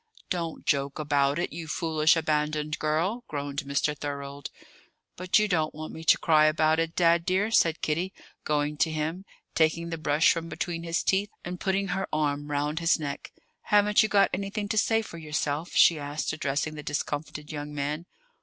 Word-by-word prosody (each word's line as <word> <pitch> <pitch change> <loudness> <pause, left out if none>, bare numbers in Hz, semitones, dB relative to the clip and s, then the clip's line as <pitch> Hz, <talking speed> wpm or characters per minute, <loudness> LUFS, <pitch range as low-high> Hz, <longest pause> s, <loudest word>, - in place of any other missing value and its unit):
'" - - -28
"Don't 170 -3 -3
joke 140 -1 0
about 145 -2 +1
it, 175 - -2
you 165 0 -6
foolish, 155 0 +2
abandoned 150 -1 -1
girl!" 170 +10 0
groaned 145 -1 -3
Mr. 140 +2 0
Thorold. 140 -1 -6 0.7
"But 185 0 +2
you 210 0 +3
don't 160 -6 0
want 155 0 -7
me 160 - -8
to - - +6
cry 155 -2 +4
about 155 +1 +3
it, 165 0 -1
Dad 170 -1 +4
dear," 190 +5 +1
said 165 -7 +3
Kitty, 170 +5 -1 0.3
going 150 0 0
to 160 - +2
him, 160 +4 -3 0.3
taking 165 +1 +1
the 165 - -4
brush 150 +1 +3
from 165 0 -5
between 170 -2 -3
his 170 +1 -1
teeth, 200 +2 +1 0.2
and 180 0 -5
putting 195 0 0
her 190 +2 -1
arm 145 -1 -1
round 150 +2 -1
his 165 0 +2
neck. 140 -2 -5 0.3
"Haven't 210 0 +4
you 215 - +1
got 200 -1 +4
anything 200 +2 -3
to 220 - -1
say 225 +1 +2
for 170 -5 -9
yourself?" 150 +1 -2
she 165 -3 +6
asked, 145 +2 -3
addressing 155 0 -2
the 150 - -7
discomfited 150 +1 -4
young 150 -1 -5
man. 150 +4 -3
155 Hz, 185 wpm, -27 LUFS, 150-175 Hz, 0.7 s, to